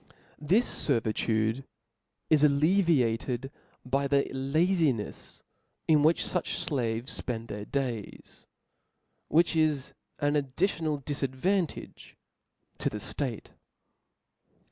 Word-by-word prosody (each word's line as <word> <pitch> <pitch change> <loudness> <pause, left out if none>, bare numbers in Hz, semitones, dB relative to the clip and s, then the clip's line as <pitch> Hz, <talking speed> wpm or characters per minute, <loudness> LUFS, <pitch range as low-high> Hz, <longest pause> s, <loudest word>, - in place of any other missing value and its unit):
This 190 +11 +2
fervitude 110 -1 +1 0.7
is 150 -2 +5
alleviated 140 - +2 0.3
by 135 +2 0
the 140 0 +3
lazincfs 140 - 0 0.4
in 155 -2 +5
which 160 +3 +3
fuch 180 -3 -1
flaves 120 -2 -1
fpend 115 -2 -4
their 105 0 -5
days; 125 -7 -5 0.8
which 165 +1 +3
is 155 -4 +1 0.2
an 145 -1 +1
addi 145 -2 +1
tional 155 -7 0
difadvantage 145 +6 -2 0.6
to - - +1
the 105 - -5
ftate. 120 +2 -4
140 Hz, 95 wpm, -29 LUFS, 120-155 Hz, 0.8 s, is